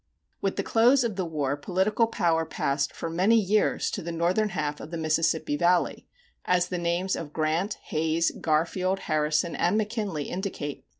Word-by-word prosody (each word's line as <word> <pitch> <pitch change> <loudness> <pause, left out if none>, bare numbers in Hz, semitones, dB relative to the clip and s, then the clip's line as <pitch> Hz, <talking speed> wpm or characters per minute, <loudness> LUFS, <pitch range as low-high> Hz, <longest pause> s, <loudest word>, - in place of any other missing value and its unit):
With 195 - -1
the - - -1
close 245 +4 +4
of 230 -4 -2
the 185 -2 -2
war 145 -4 -1
political 190 +9 +1
power 165 -7 +1
passed 140 -3 -1
for - - -5
many 185 +7 +3
years 210 +1 +1
to - - -4
the 170 - -5
northern 180 +6 +1
half 150 -5 -3
of - - -8
the 170 - -5
Mississippi 160 -1 +1
Valley, 175 +3 +1 0.4
as 180 0 +1
the 180 - -2
names 175 +2 0
of 155 -3 -7
Grant, 160 +6 0 0.2
Hayes, 160 +2 +1
Garfield, 180 +4 0
Harrison, 155 +2 0
and 180 +5 +1
McKinley 210 -7 -2
indicate. 175 -5 -5
170 Hz, 170 wpm, -27 LUFS, 155-195 Hz, 0.4 s, close